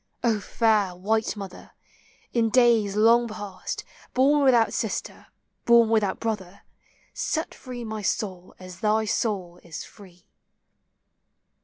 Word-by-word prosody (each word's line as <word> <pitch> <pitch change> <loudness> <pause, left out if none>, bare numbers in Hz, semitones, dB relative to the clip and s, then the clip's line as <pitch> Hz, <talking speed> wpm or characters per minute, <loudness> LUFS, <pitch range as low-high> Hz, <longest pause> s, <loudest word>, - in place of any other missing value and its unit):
O 225 -3 +2
fair 210 -3 +1
white 220 +4 -1
mother, 195 -3 -9 0.6
in 230 -2 +2
days 230 -4 +4
long 230 +3 +5
past 205 -4 -6 0.3
Born 280 +3 +4
without 240 -4 +4
sister, - - -4 0.4
born 235 -1 +6
without 215 -4 +1
brother, 205 -5 -4 0.5
Set 315 0 -2
free 250 -2 -8
my 220 -1 -5
soul 185 -2 -3
as 185 -1 -11
thy 215 +1 +2
soul 195 -6 -2
is 170 -3 -8
free. 180 -3 -16
215 Hz, 120 wpm, -25 LUFS, 190-235 Hz, 0.6 s, born